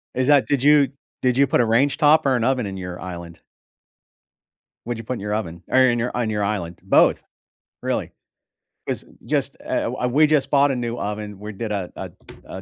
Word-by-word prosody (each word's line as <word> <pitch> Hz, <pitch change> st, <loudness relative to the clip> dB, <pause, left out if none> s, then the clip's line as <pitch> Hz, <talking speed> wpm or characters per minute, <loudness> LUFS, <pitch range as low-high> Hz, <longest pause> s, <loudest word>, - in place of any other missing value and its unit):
Is 130 Hz, +1 st, 0 dB
that 145 Hz, -2 st, +4 dB
did 140 Hz, -3 st, 0 dB
you 145 Hz, -2 st, +5 dB, 0.3 s
did 125 Hz, 0 st, +1 dB
you 140 Hz, -, +5 dB
put -, -, +1 dB
a -, -, +2 dB
range 125 Hz, +6 st, +2 dB
top 150 Hz, -1 st, +4 dB
or 135 Hz, -2 st, +3 dB
an 115 Hz, -, 0 dB
oven 130 Hz, -4 st, +1 dB
in 95 Hz, -1 st, -5 dB
your 90 Hz, -1 st, -6 dB
island? 85 Hz, -2 st, -8 dB, 1.5 s
What'd 120 Hz, -1 st, -4 dB
you -, -, -7 dB
put 125 Hz, -, -4 dB
in 120 Hz, -, -5 dB
your 105 Hz, +1 st, -3 dB
oven 85 Hz, -5 st, -5 dB
or 130 Hz, -, +3 dB
in 125 Hz, -2 st, +4 dB
your 120 Hz, +1 st, -2 dB
on 120 Hz, -3 st, -1 dB
your 105 Hz, -1 st, -1 dB
island? 95 Hz, -5 st, -3 dB
Both, -, -, +3 dB, 0.6 s
really. -, -, -2 dB, 0.8 s
'Cause -, -, -3 dB, 0.2 s
just, -, -, -1 dB
eh, -, -, -1 dB
eh, -, -, -2 dB
wha 125 Hz, -, -2 dB
we 150 Hz, +5 st, +4 dB
just 140 Hz, -3 st, +1 dB
bought 140 Hz, 0 st, +4 dB
a -, -, -1 dB
new 120 Hz, -1 st, -3 dB
oven. 105 Hz, -1 st, -5 dB
We 105 Hz, +1 st, -7 dB
did 110 Hz, +2 st, -5 dB
a 95 Hz, -4 st, -3 dB
a -, -, -7 dB, 0.3 s
a 95 Hz, -, -8 dB
120 Hz, 220 wpm, -22 LUFS, 100-135 Hz, 1.5 s, you